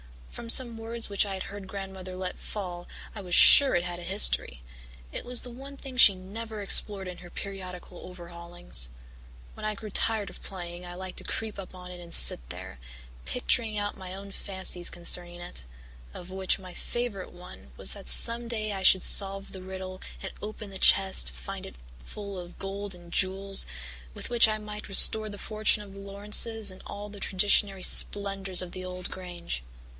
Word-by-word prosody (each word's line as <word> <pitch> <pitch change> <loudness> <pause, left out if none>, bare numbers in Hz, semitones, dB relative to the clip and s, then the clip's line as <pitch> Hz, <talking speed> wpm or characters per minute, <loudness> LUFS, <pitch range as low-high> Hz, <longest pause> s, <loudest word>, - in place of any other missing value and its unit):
From 230 - -9
some 235 -1 +5
words 225 0 -2
which 200 +1 +1
I 195 - -4
had 190 - -5
heard 200 -1 -9
Grandmother 190 -1 -8
let 185 0 -6
fall 180 -4 -7 0.3
I 210 - -8
was 180 -2 -1
sure 280 -2 +10
it 175 - 0
had 175 0 -6
a - - -10
history; 170 - +1 0.5
it - - -6
was 245 0 +1
the 245 - -10
one 275 +3 -11
thing 270 -2 -10
she 205 -6 +7
never 210 +4 -8
explored 195 -1 +2
in 180 -1 -8
her 175 - -13
periodical 185 -2 -9
overhaulings. 170 - -2 0.6
When - - -9
I 215 0 -2
grew 215 +1 -10
tired 210 -2 +1
of - - -13
playing 175 -2 -8
I 175 0 -9
liked 185 0 -9
to - - -6
creep 220 -2 -5
up 185 -1 -10
on 180 0 -11
it 180 - -10
and 170 -1 -10
sit - - +6
there, 65 - -9 0.5
picturing 215 - -1
out 205 0 -4
my 185 -1 -8
own 200 +1 -10
fancies 190 -3 -3
concerning 175 0 -2
it 60 - -2 0.5
of 180 +1 -10
which 190 0 0
my 185 -2 -12
favourite 240 -5 -5
one 65 - -14
was - - +2
that - - -10
some 230 - +2
day 215 -2 -3
I 195 -1 -5
should 190 -1 +4
solve 195 0 +5
the 190 - -9
riddle 185 0 -8 0.2
and - - -5
open 210 -1 -8
the 190 - -8
chest 190 - +5
to 60 - -1
find 60 0 -8
it - - -12 0.3
full 200 - -8
of 175 0 -11
gold 195 0 -5
and 175 -1 -16
jewels 195 +1 +2 0.5
with - - -6
which 235 -2 +6
I 215 0 -2
might 210 0 -9
restore 215 +2 +6
the 205 - -9
fortune 215 0 0
of 200 -1 -14
the 195 - -12
Laurances 205 +2 -1
and 185 - -13
all 205 +1 -8
the 205 0 -11
traditionary 195 0 +2
splendours 195 -2 +3
of 175 - -10
the 185 - -8
old 180 0 -7
Grange. 175 - -6
195 Hz, 195 wpm, -27 LUFS, 180-210 Hz, 0.6 s, sure